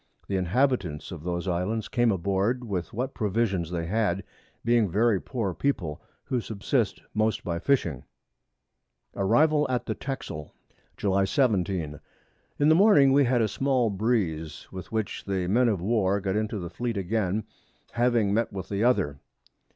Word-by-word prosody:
The 100 Hz, -, -2 dB
Inhabitants 95 Hz, -, 0 dB
of 85 Hz, -4 st, -7 dB
those 85 Hz, +2 st, -3 dB
Islands 95 Hz, +5 st, -1 dB
came 120 Hz, -2 st, +2 dB
aboard 100 Hz, +6 st, 0 dB
with 95 Hz, -7 st, -3 dB
what 125 Hz, +4 st, -3 dB
Provisions 100 Hz, -5 st, 0 dB
they 85 Hz, -2 st, -3 dB
had, 100 Hz, -1 st, 0 dB, 0.4 s
being 120 Hz, -3 st, +3 dB
very 105 Hz, +1 st, +2 dB
poor 110 Hz, -8 st, -3 dB
People, 90 Hz, -, -2 dB, 0.2 s
who 125 Hz, -2 st, -1 dB
subsist 110 Hz, -1 st, -1 dB
most 110 Hz, +1 st, 0 dB
by 85 Hz, -1 st, -2 dB
Fishing. 90 Hz, -, 0 dB, 1.1 s
[Sidenote: 100 Hz, -, -2 dB
Arrival 150 Hz, +5 st, +4 dB
at 125 Hz, -1 st, -1 dB
the -, -, -1 dB
Texel.] 130 Hz, -, -6 dB, 0.4 s
July 100 Hz, -1 st, +2 dB
17. 95 Hz, -, 0 dB, 0.6 s
In 145 Hz, +1 st, +4 dB
the -, -, +7 dB
Morning 160 Hz, -7 st, +6 dB
we 140 Hz, 0 st, +5 dB
had 120 Hz, -1 st, +2 dB
a -, -, +2 dB
small 130 Hz, -1 st, +1 dB
Breeze, 95 Hz, -, -1 dB
with 95 Hz, -1 st, -8 dB
which 110 Hz, -2 st, -3 dB
the 95 Hz, -2 st, -1 dB
Men 120 Hz, +6 st, +3 dB
of 100 Hz, -6 st, -1 dB
War 100 Hz, -2 st, +2 dB
got 95 Hz, -1 st, -2 dB
into 110 Hz, 0 st, -1 dB
the 85 Hz, -3 st, -6 dB
Fleet 120 Hz, +3 st, -3 dB
again, 100 Hz, +1 st, 0 dB, 0.5 s
having 120 Hz, -4 st, +2 dB
met 115 Hz, +2 st, +1 dB
with 95 Hz, -2 st, -6 dB
the 100 Hz, +1 st, -1 dB
other. 75 Hz, -, +2 dB
105 Hz, 160 wpm, -27 LUFS, 90-120 Hz, 1.1 s, the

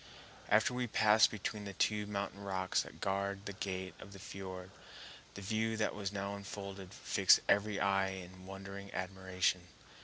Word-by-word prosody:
After 110 Hz, +4 st, +4 dB
we 125 Hz, 0 st, -1 dB
passed 110 Hz, 0 st, +6 dB
between 105 Hz, 0 st, -4 dB
the 100 Hz, -, -5 dB
two 105 Hz, -1 st, +1 dB
mountain 100 Hz, -1 st, -3 dB
rocks 95 Hz, -1 st, +1 dB
that -, -, -10 dB
guard 100 Hz, +1 st, -1 dB
the 100 Hz, -, -4 dB
gate 95 Hz, -1 st, -3 dB
of 100 Hz, -, -10 dB
the 100 Hz, -, -10 dB
fiord, 95 Hz, -1 st, -7 dB, 0.6 s
the 100 Hz, -, -7 dB
view 110 Hz, +2 st, 0 dB
that 110 Hz, -, +1 dB
was 100 Hz, -2 st, -3 dB
unfolded 100 Hz, -1 st, -5 dB
fixed -, -, +5 dB
every 105 Hz, 0 st, +3 dB
eye 95 Hz, 0 st, +3 dB
in 95 Hz, 0 st, -8 dB
wondering 100 Hz, +1 st, -7 dB
admiration. 95 Hz, -1 st, 0 dB
100 Hz, 155 wpm, -35 LUFS, 95-105 Hz, 0.6 s, passed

